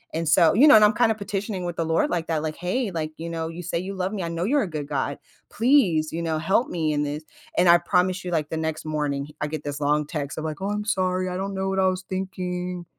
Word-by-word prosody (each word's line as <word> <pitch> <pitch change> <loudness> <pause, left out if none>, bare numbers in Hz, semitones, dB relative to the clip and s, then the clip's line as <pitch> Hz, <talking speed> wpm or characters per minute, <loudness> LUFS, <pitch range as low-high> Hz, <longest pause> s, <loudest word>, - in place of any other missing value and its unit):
and 165 -1 -1
so 165 +1 +5
You 275 +8 +6
know, 290 - +9
and 215 - +7
I'm 210 +1 +6
kinda 225 0 +3
petitioning 200 -2 -4
with 175 -1 -3
the 165 - 0
Lord 160 0 +1
like 170 -2 -2
that. 160 -2 0
Like, 155 -1 -3
"Hey, 195 +6 -1
like, 155 -2 -3
you 165 +1 -5
know, 165 -1 -3
you 170 +2 -7
say 170 - -2
you 190 +2 -5
love 185 +1 -2
me. 190 -4 -3
I 170 - -3
know 170 +1 -3
you're 280 +2 +2
a - - -3
good 150 -3 -5
God, 140 -1 -2 0.3
please, 210 - +3
you 170 - -3
know, 160 -1 -1
help 195 +9 +2
me 160 -3 -1
in 145 0 0
this," 150 +2 -4 0.3
and 175 - +5
I 170 - +9
promise 180 +2 +1
you, 175 - -3
like, 155 -3 -1
the 160 - -3
next 160 -1 -3
morning 145 -2 -2
he 150 0 -15
I 150 - 0
get 155 -1 -5
this 145 0 -4
long 150 +1 +1
text 150 -3 -4
of - - -5
like, 155 -1 -4
"Oh, 195 - -1
I'm 210 0 -2
sorry. 185 -3 0
I 180 - -3
don't 195 +1 -3
know 190 0 -1
what 190 0 -1
I 190 - +4
was 185 0 -1
thinking," 180 -2 -4
175 Hz, 285 wpm, -24 LUFS, 155-190 Hz, 0.3 s, know